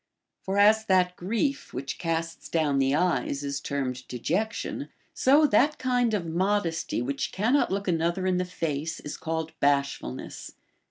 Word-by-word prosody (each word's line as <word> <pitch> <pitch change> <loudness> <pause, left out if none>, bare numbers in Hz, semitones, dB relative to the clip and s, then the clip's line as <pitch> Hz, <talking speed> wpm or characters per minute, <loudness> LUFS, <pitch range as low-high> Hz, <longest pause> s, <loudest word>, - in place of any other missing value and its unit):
For 195 +1 -2
as 215 +2 +5
that 180 -2 +3
grief 230 +11 -2
Λvhich 135 +2 -5
casts 165 -1 -3
down 150 -4 +1
the 135 +1 +2
eyes 145 -4 0
is 140 0 -3
termed 130 -3 -3
dejection, 180 - -2 0.2
so 290 +4 +5
tliat 290 +6 +3
kind 245 -3 +1
of 185 -5 -2
modesty 170 - 0
which 135 +2 -2
cannot 235 +9 +2
look 195 +1 -2
another 170 +2 0
in 185 -1 +2
the 180 - +1
face 165 -3 -3
is 150 - -6
called 160 0 -3
bashfulness. 140 - -1
170 Hz, 150 wpm, -27 LUFS, 140-205 Hz, 0.2 s, as